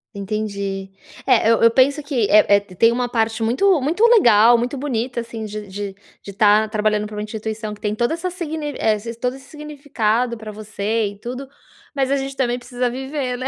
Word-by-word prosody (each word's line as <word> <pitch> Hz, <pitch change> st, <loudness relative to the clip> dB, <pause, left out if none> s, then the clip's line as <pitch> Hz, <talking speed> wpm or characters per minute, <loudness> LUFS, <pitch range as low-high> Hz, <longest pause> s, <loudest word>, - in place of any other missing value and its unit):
Entendi. 200 Hz, -1 st, -4 dB, 0.4 s
É, 230 Hz, -3 st, +4 dB
eu 230 Hz, -, +2 dB
eu 230 Hz, -, +7 dB
penso 275 Hz, +5 st, +3 dB
que 275 Hz, -6 st, -1 dB
é 210 Hz, -1 st, +6 dB
é 200 Hz, -, +4 dB
tem 200 Hz, +3 st, +2 dB
uma 245 Hz, 0 st, -1 dB
parte 225 Hz, -1 st, -1 dB
muito 295 Hz, -, +2 dB
muito 325 Hz, +10 st, -1 dB
legal, 235 Hz, -, +6 dB
muito 250 Hz, +4 st, -2 dB
bonita, 250 Hz, -3 st, -2 dB
assim, 230 Hz, -1 st, -6 dB
de 210 Hz, -1 st, -6 dB
de 200 Hz, 0 st, -6 dB, 0.3 s
de 200 Hz, -, -8 dB
tá 210 Hz, +1 st, +4 dB
trabalhando 210 Hz, -1 st, 0 dB
pra 210 Hz, 0 st, -8 dB
uma -, -, -3 dB
instituição 215 Hz, 0 st, -5 dB
que 210 Hz, -, -14 dB
tem 210 Hz, -1 st, -1 dB
toda 240 Hz, +7 st, 0 dB
essa 365 Hz, +2 st, -3 dB
sign 320 Hz, -4 st, -5 dB
eh, 215 Hz, -1 st, +2 dB, 0.2 s
todo 250 Hz, +1 st, -1 dB
esse 270 Hz, 0 st, -15 dB
significado 255 Hz, -6 st, -2 dB
pra 215 Hz, -1 st, -8 dB
você 215 Hz, +1 st, -2 dB
e 200 Hz, 0 st, -9 dB
tudo. 255 Hz, +4 st, -7 dB, 0.4 s
Mas 270 Hz, -2 st, 0 dB
a 280 Hz, -, +2 dB
gente 270 Hz, 0 st, -3 dB
também 245 Hz, -2 st, 0 dB
precisa 245 Hz, 0 st, -3 dB
viver, 265 Hz, 0 st, -4 dB
né, 255 Hz, -, -3 dB
230 Hz, 200 wpm, -20 LUFS, 210-265 Hz, 0.4 s, eu